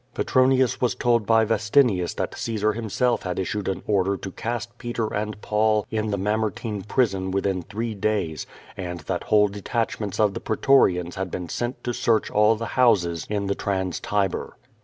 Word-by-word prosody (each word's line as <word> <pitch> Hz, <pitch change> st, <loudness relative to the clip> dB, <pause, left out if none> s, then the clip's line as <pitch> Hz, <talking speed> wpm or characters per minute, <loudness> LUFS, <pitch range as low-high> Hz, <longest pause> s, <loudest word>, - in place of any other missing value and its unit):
Petronius 130 Hz, -1 st, +2 dB
was 125 Hz, -, +1 dB
told 120 Hz, -3 st, +1 dB
by 110 Hz, -1 st, +4 dB
Vestinius 110 Hz, -4 st, +2 dB
that -, -, -3 dB
Caesar 110 Hz, -2 st, -1 dB
himself 115 Hz, +3 st, 0 dB
had 90 Hz, -1 st, -4 dB
issued 100 Hz, +2 st, -2 dB
an 95 Hz, -, -2 dB
order 100 Hz, -1 st, +1 dB
to 95 Hz, -, -7 dB
cast 120 Hz, +3 st, -4 dB
Peter 120 Hz, -2 st, -3 dB
and 105 Hz, 0 st, -3 dB
Paul 105 Hz, 0 st, +2 dB
in 110 Hz, -1 st, -1 dB
the 100 Hz, -, -1 dB
Mamertine 105 Hz, +1 st, -2 dB
prison 100 Hz, -3 st, 0 dB
within 95 Hz, -1 st, 0 dB
three 110 Hz, +6 st, -4 dB
days, 95 Hz, -7 st, -2 dB, 0.3 s
and 90 Hz, -3 st, -5 dB
that -, -, -3 dB
whole 105 Hz, -1 st, +4 dB
detachments 105 Hz, 0 st, -3 dB
of 105 Hz, -2 st, +3 dB
the -, -, -4 dB
pretorians 90 Hz, -11 st, +2 dB
had 95 Hz, -, -2 dB
been 90 Hz, -2 st, -5 dB
sent 120 Hz, +7 st, -3 dB
to 120 Hz, -, -2 dB
search 115 Hz, -2 st, +1 dB
all 105 Hz, +1 st, +4 dB
the 115 Hz, 0 st, -5 dB
liouses 90 Hz, -10 st, +2 dB
in 105 Hz, -1 st, -1 dB
the 100 Hz, -, 0 dB
Trans 95 Hz, -3 st, -2 dB
Tiber. 100 Hz, -3 st, -2 dB
105 Hz, 175 wpm, -24 LUFS, 95-115 Hz, 0.3 s, by